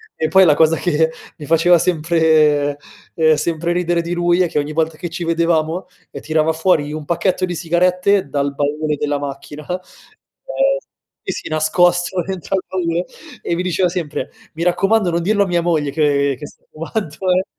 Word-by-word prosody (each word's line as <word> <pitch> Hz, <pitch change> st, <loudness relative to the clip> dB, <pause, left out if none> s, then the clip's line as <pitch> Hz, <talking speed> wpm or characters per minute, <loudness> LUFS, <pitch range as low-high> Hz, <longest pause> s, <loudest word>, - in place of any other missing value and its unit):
e 160 Hz, -, -1 dB
poi 190 Hz, +3 st, +5 dB
la 155 Hz, -, +6 dB
cosa 160 Hz, +1 st, +4 dB
che 160 Hz, -2 st, +1 dB, 0.3 s
mi 150 Hz, -, -9 dB
faceva 165 Hz, +2 st, +5 dB
sempre 155 Hz, -4 st, +2 dB, 0.4 s
ehm, 160 Hz, -1 st, +4 dB
sempre 165 Hz, +2 st, -2 dB
ridere 175 Hz, -1 st, 0 dB
di 170 Hz, +1 st, -4 dB
lui 175 Hz, +1 st, +2 dB
è 180 Hz, -, +3 dB
che 150 Hz, -, 0 dB
ogni 145 Hz, +1 st, -3 dB
volta 160 Hz, 0 st, 0 dB
che 175 Hz, -, -5 dB
ci 170 Hz, +1 st, -5 dB
vedevamo, 165 Hz, +1 st, 0 dB, 0.2 s
ehm, -, -, -8 dB
tirava 155 Hz, 0 st, +1 dB
fuori 160 Hz, -3 st, +1 dB
un 155 Hz, -1 st, -6 dB
pacchetto 185 Hz, +3 st, 0 dB
di 180 Hz, -1 st, -4 dB
sigarette 180 Hz, +2 st, +1 dB
dal 140 Hz, 0 st, -1 dB
baule 150 Hz, +2 st, -1 dB
della 145 Hz, 0 st, -1 dB
macchina, 145 Hz, +1 st, -7 dB
ehm 180 Hz, -, -1 dB, 1.5 s
sì, -, -, -2 dB
sì -, -, -7 dB
nascosto 175 Hz, +3 st, +1 dB
dentro 190 Hz, 0 st, -3 dB
al 185 Hz, -, -3 dB
baule 175 Hz, -1 st, -1 dB, 0.4 s
e 170 Hz, -, -2 dB
mi 175 Hz, -, -2 dB
diceva 185 Hz, 0 st, +1 dB
sempre: 170 Hz, -4 st, -4 dB, 0.3 s
"Mi 165 Hz, -, -3 dB
raccomando, 195 Hz, +3 st, +2 dB
non 170 Hz, 0 st, 0 dB
dirlo 200 Hz, +3 st, +2 dB
a -, -, -3 dB
mia 175 Hz, -1 st, +1 dB
moglie 160 Hz, -4 st, 0 dB
che 140 Hz, -2 st, +1 dB
che 145 Hz, -, -8 dB
sto -, -, -16 dB
fumando 165 Hz, 0 st, -5 dB, 0.2 s
eh" 185 Hz, +1 st, +2 dB
165 Hz, 185 wpm, -18 LUFS, 155-180 Hz, 1.5 s, la